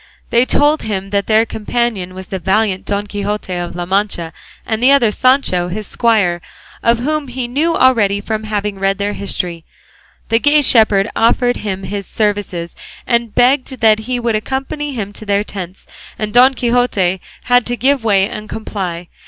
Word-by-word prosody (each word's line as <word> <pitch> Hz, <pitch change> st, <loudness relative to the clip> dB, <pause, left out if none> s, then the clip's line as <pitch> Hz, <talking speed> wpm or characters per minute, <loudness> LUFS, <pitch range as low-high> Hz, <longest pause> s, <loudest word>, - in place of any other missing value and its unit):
They 240 Hz, +2 st, +3 dB
told 295 Hz, +2 st, +3 dB
him 195 Hz, -2 st, -4 dB
that 200 Hz, -1 st, 0 dB
their 220 Hz, +1 st, +4 dB
companion 215 Hz, -4 st, -2 dB
was 190 Hz, 0 st, -7 dB
the 190 Hz, +1 st, -5 dB
valiant 195 Hz, +1 st, 0 dB
Don 205 Hz, 0 st, -1 dB
Quixote 205 Hz, -1 st, -4 dB
of 175 Hz, -1 st, -4 dB
La 175 Hz, 0 st, -3 dB
Mancha, 185 Hz, -3 st, -1 dB, 0.3 s
and 220 Hz, 0 st, -2 dB
the 255 Hz, -, +5 dB
other 250 Hz, -6 st, +4 dB
Sancho 255 Hz, -8 st, +2 dB
his 210 Hz, +4 st, -5 dB
squire, 200 Hz, -8 st, +1 dB, 0.4 s
of 235 Hz, 0 st, +3 dB
whom 295 Hz, +4 st, -2 dB
he 250 Hz, -1 st, -4 dB
knew 305 Hz, +7 st, 0 dB
already 215 Hz, -6 st, +3 dB
from 215 Hz, +1 st, -4 dB
having 210 Hz, -2 st, -3 dB
read 195 Hz, 0 st, +1 dB
their 205 Hz, 0 st, -2 dB
history. 175 Hz, -4 st, -3 dB, 0.7 s
The 225 Hz, -, +3 dB
gay 295 Hz, +2 st, +4 dB
shepherd 215 Hz, -5 st, +4 dB
offered 245 Hz, +2 st, +2 dB
him 195 Hz, -2 st, -4 dB
his 200 Hz, 0 st, -5 dB
services 205 Hz, -5 st, -2 dB, 0.3 s
and 235 Hz, -2 st, 0 dB
begged 255 Hz, +1 st, +2 dB
that 220 Hz, -1 st, +5 dB
he 250 Hz, -1 st, 0 dB
would 235 Hz, -2 st, 0 dB
accompany 270 Hz, +6 st, -3 dB
him 205 Hz, -3 st, -4 dB
to 215 Hz, -, -8 dB
their 205 Hz, -1 st, +1 dB
tents, 190 Hz, -3 st, -8 dB, 0.3 s
and 210 Hz, -1 st, -4 dB
Don 255 Hz, +2 st, +6 dB
Quixote 235 Hz, -7 st, +1 dB, 0.2 s
had 245 Hz, 0 st, +3 dB
to 245 Hz, 0 st, -2 dB
give 270 Hz, +1 st, +1 dB
way 200 Hz, -3 st, +3 dB
and 215 Hz, 0 st, -8 dB
comply. 180 Hz, -6 st, -5 dB
215 Hz, 175 wpm, -16 LUFS, 195-245 Hz, 0.7 s, Don